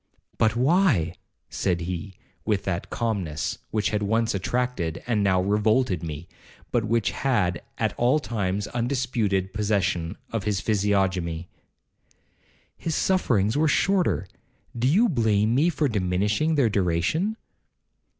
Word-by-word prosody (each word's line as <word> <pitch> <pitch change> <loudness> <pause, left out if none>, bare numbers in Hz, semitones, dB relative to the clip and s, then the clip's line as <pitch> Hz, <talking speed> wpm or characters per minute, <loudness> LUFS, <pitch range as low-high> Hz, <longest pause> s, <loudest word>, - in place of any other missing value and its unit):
—'But 110 +1 +3
why?'—said 120 - 0
he, 90 +2 -5 0.3
with 105 -3 0
that 85 -3 -3
calmness 95 -10 -2
which 105 -1 0
had 105 -1 0
once 110 +2 +1
attracted, 100 -4 -2
and 115 -4 +1
now 95 -2 +3
revolted 105 -1 +2
me, 80 0 -6 0.4
but 115 -3 +1
which 115 -1 +1
had 90 -10 0 0.2
at - - 0
all 125 +5 +4
times 105 -6 -2
undisputed 120 -6 -1
possession 100 -4 0
of 115 -3 -2
his 105 -2 0
physiognomy;—'his 95 - -4
sufferings 115 - +2
were 155 +2 +3
shorter, 175 - +2 0.5
do 120 +2 +1
you 200 - +4
blame 110 - +2
me 150 +7 +3
for 155 -3 0
diminishing 105 - 0
their 140 -5 +3
duration?' 100 - 0
105 Hz, 120 wpm, -25 LUFS, 95-125 Hz, 0.5 s, all